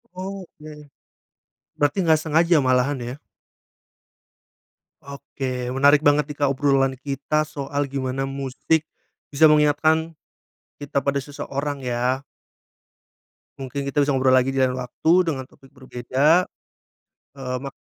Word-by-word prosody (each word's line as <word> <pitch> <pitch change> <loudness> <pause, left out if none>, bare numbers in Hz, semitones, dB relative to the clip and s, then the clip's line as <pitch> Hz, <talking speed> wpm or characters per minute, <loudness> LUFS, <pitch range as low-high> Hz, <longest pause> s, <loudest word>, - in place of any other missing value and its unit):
Oh 190 -1 -6
oke. 150 0 -13 1.1
Berarti 145 +5 +1
nggak 160 -1 +4
sengaja 165 +2 +2
malahan 130 +1 +1
ya? 120 +3 -6 1.9
Oke, 130 -3 -5
menarik 145 +3 +4
banget 145 +1 +3
nih 150 - -7
Kak 140 - +3
obrolan 135 -1 +2
kita 145 +2 -2
soal 140 0 -3
gimana 135 0 -3
musik 140 +3 -1 0.5
bisa 155 +2 +5
mengingatkan 155 +2 +3 0.7
kita 140 -1 -2
pada 140 +1 0
seseorang 140 0 -5
ya. 125 +2 -1 1.4
Mungkin 135 +1 -5
kita 145 - 0
bisa 140 -1 +1
ngobrol 130 0 +3
lagi 130 +1 +3
di - - 0
lain 130 - +2
waktu 125 +6 -1 0.2
dengan 135 -5 -2
topik 135 +1 -20
berbeda, 130 +7 +1 0.9
eee, 125 -1 -4
mak 135 -1 -7
140 Hz, 120 wpm, -22 LUFS, 130-150 Hz, 1.9 s, bisa